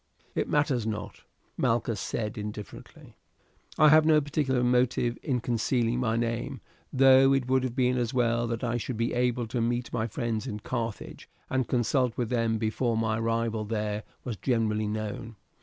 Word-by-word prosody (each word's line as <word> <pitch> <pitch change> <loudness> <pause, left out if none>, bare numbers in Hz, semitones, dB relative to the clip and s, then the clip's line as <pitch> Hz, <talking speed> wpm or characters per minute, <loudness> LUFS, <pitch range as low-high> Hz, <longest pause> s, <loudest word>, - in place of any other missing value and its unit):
"It - - -1
matters 135 -6 +1
not," 105 -1 -5 0.4
Malchus 115 -2 0
said 105 +1 -3
indifferently; 105 -1 -9 0.6
"I 155 -1 +7
have 155 +1 +7
no 155 -1 +5
particular 140 -3 0
motive 125 -1 +2
in 125 -4 -1
concealing 120 0 0
my 115 -3 0
name, 115 0 -2 0.3
though 135 0 +6
it 130 -2 -1
would 130 0 +2
have 125 -2 -3
been 125 -1 +2
as 120 -1 -1
well 120 -2 +1
that 115 0 -3
I 120 0 0
should 120 0 -4
be 115 +1 0
able 125 -1 +1
to 115 +1 -2
meet 120 +1 -1
my 110 0 0
friends 115 -2 -3
in 105 0 -5
Carthage 115 -3 -5 0.2
and 130 -3 0
consult 125 0 +1
with 120 -3 -1
them 115 -2 +1
before 110 +2 0
my 110 0 0
arrival 115 -1 -1
there 105 -1 -2 0.2
was 120 -5 -4
generally 110 -1 0
known. 110 +1 -4
120 Hz, 170 wpm, -28 LUFS, 110-125 Hz, 0.6 s, I